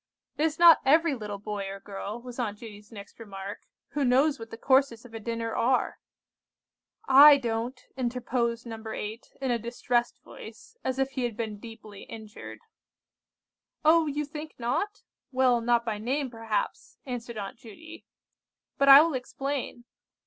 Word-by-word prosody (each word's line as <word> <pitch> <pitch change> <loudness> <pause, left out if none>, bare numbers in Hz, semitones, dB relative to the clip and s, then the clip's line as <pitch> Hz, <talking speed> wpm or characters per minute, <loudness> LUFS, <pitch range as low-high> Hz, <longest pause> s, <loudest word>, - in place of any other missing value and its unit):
"It 305 - +1
is 315 -1 -1
not 340 -1 +8
every 315 +3 +4
little 210 -5 -5
boy 205 -1 -5
or 195 0 -7
girl," 205 +3 -6
was 250 0 -9
Aunt 210 -4 -2
Judy's 210 -1 -12
next 200 0 -12
remark, 200 -2 -8 0.2
"who 290 - -1
knows 275 +3 +3
what 225 0 -9
the 225 - -9
courses 260 -2 +2
of 235 - -14
a 225 - -5
dinner 230 0 -4
are." 250 +2 +1 1.1
"I 285 +2 +9
don't," 240 0 -3 0.2
interposed 240 -2 -2
No. 225 -1 -8
8, 220 +1 -6
in 265 -2 -1
a 235 - +1
distressed 240 +1 -1
voice, 450 - -12
as 260 0 -2
if 270 0 0
he 260 -1 -3
had 230 -3 -4
been 215 -3 -4
deeply 215 -2 -11
injured. 220 -1 -10 1.2
"Oh, 320 0 +5
you 295 +1 -2
think 300 +1 -8
not? 325 - -2 0.3
Well, 255 -2 +3
not 235 0 +2
by 215 -3 -2
name, 260 +4 -2
perhaps," 225 -2 -3
answered 240 -3 -6
Aunt 200 +2 -6
Judy. 320 +9 -13 0.7
"But 275 0 +4
I 275 +1 +12
will 330 -1 -1
explain. 260 -1 -4
240 Hz, 160 wpm, -27 LUFS, 225-275 Hz, 1.2 s, I